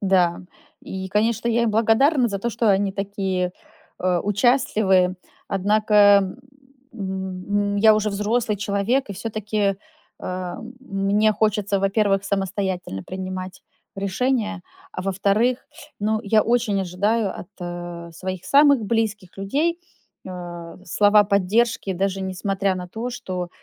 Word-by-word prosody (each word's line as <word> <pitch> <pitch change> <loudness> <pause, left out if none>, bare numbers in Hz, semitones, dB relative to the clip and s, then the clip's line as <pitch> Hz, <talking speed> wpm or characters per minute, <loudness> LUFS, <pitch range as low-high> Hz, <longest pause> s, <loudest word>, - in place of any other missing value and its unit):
Да, 185 -3 +2 0.4
и 190 0 -6
конечно, 225 +3 +1
я 235 0 +2
им 225 - +1
благодарна 235 +5 +3
за 200 -1 -3
то, 235 - -2
что 230 -1 +2
они 195 0 +2
такие, 195 -2 -2 0.5
э, 180 -1 +2
участливые. 205 - +2 0.3
Однако, 205 0 +4 0.6
м 190 0 -2
м, - - -1
я 215 +1 +6
уже 215 0 0
взрослый 210 +2 0
человек 205 +5 0
и - - -2
всё-таки, 210 -1 -2 0.4
а, 180 -1 -5 0.2
мне 205 -2 +1
хочется, 210 -2 +1
во-первых, 195 0 +1
самостоятельно 190 - -2
принимать 185 0 -6 0.3
решения, 210 0 -1 0.3
а 185 - -5
во-вторых, 200 +6 +1 0.3
ну, 215 +1 0
я 215 +1 +3
очень 230 -4 +1
ожидаю 200 +3 0
от 175 -3 -8
своих 185 +1 -5
самых 280 -3 +5
близких 210 -4 -2
людей, 300 +13 0 0.5
а, 175 -2 -8
слова 205 +3 +4
поддержки, 200 +2 +1
даже 195 +1 -1
несмотря 190 +1 -1
на 180 -1 -6
то, 230 +6 -5
что 185 -8 -5
200 Hz, 120 wpm, -22 LUFS, 185-220 Hz, 0.6 s, я